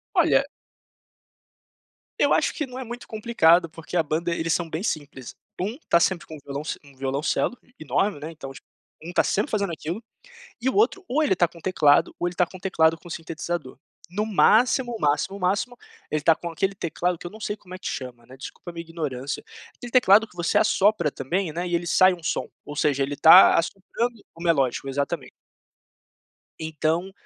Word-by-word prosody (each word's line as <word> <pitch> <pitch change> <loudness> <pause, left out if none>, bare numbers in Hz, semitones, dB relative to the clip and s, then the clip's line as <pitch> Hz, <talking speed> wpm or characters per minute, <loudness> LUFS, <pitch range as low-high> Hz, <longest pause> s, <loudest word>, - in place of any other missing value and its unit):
Olha - - +4 1.8
Eu - - +4
acho - - +1
que 300 - -3
não 255 0 -9
é - - -5
muito 240 +1 -8
complicado, 180 -7 +3
porque 165 +2 -7
a 170 - +4
banda, 165 +3 -1
eles 165 0 -1
são 170 -2 -1
bem 160 +3 -4
simples. 145 - -5 0.2
Um 210 +8 -3
tá 170 - +5
sempre 180 0 +1
com 160 - -10
o - - -9
violonc 140 +2 -4
um 140 -1 -18
violoncelo 135 - -1
e - - -28
enorme, 190 +6 0
né, 155 +2 -7
então, 135 -4 -9
tipo, 135 - -15 0.4
um 175 - -6
tá - - +3
sempre 210 - 0
fazendo 200 -4 0
aquilo. 165 +6 -5 0.6
E 255 - 0
o - - 0
outro, 400 -2 +2
ou 295 +5 +1
ele 285 -10 +3
tá 175 -2 +2
com 170 - -20
um - - -15
teclado, 150 -6 +3
ou 175 - 0
ele 175 - -8
tá 180 - +3
com 185 +2 -12
um - - -22
teclado 165 -4 +2
com 175 - -14
um - - -13
sintetizador. 165 -3 -5 0.3
No 210 +4 -2
máximo, 240 +4 +3
máximo, 150 +7 0
máximo, 200 +7 0 0.3
ele 155 - 0
tá 160 +2 +5
com 170 - -6
aquele 190 +4 -1
teclado, 175 0 -2
que - - -9
eu - - -6
não 220 - -13
sei 205 +1 -3
como 185 -2 -12
é - - -7
que - - -10
chama, 120 -3 -6
né, 130 +2 -13
desculpa 140 +5 -9
a 170 - -13
minha 165 - -5
ignorância. 150 -5 -4 0.3
Aquele 245 - -10
teclado 225 -3 +5
que 180 - -22
você 175 0 +1
assopra 205 -6 +3
também, 165 +6 -2
né, 175 +2 -2
e 175 - -2
ele 170 0 0
sai 185 +2 +5
um 175 - -8
som. 155 - -2 0.2
Ou 145 - -7
seja, 145 -2 +1
ele 140 +1 -2
tá 170 +5 +9
assoprando 210 +6 -2
o 165 - -12
melódico. 140 -6 +1
Exatamente. 140 0 -3 1.3
Então 160 +4 -1
170 Hz, 205 wpm, -24 LUFS, 155-195 Hz, 1.8 s, tá